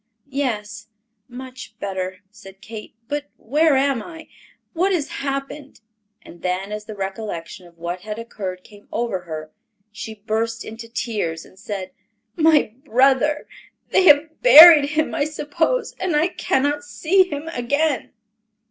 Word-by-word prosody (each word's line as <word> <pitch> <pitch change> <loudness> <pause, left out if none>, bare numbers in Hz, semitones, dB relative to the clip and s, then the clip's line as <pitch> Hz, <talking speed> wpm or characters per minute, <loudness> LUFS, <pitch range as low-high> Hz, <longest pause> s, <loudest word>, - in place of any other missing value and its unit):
"Yes, 225 -6 -3 0.4
much 255 -2 -10
better," 185 -2 -4
said 195 -2 -14
Kate; 215 +1 -10
"but 290 +1 -4
where 300 +5 +2
am 270 -3 +1
I? 320 +1 -11 0.4
What 370 +3 +1
has 330 -6 0
happened?" 275 +1 -5 0.4
And 170 - -14
then 185 +2 -2
as 210 0 -5
the 215 0 -8
recollection 190 -3 -6
of 170 -1 -21
what 170 +2 -4
had 210 +1 -6
occurred 190 -5 -6
came 205 -1 -17
over 220 -6 -2
her, 155 -2 -7 0.4
she 220 +1 -7
burst 225 +2 -3
into 230 +1 -9
tears 210 -9 -3
and 190 - -19
said, 195 -2 -6 0.4
"My 315 -9 +3
brother—they 275 +8 +1
have 310 0 +5
buried 320 -10 +10
him, 310 +1 0
I 290 -3 0
suppose, 320 +10 -1
and 360 -4 -1
I 315 +4 +3
cannot 290 -3 0
see 360 +6 +2
him 290 +2 -5
again." 285 +2 -1
240 Hz, 140 wpm, -21 LUFS, 205-295 Hz, 0.4 s, buried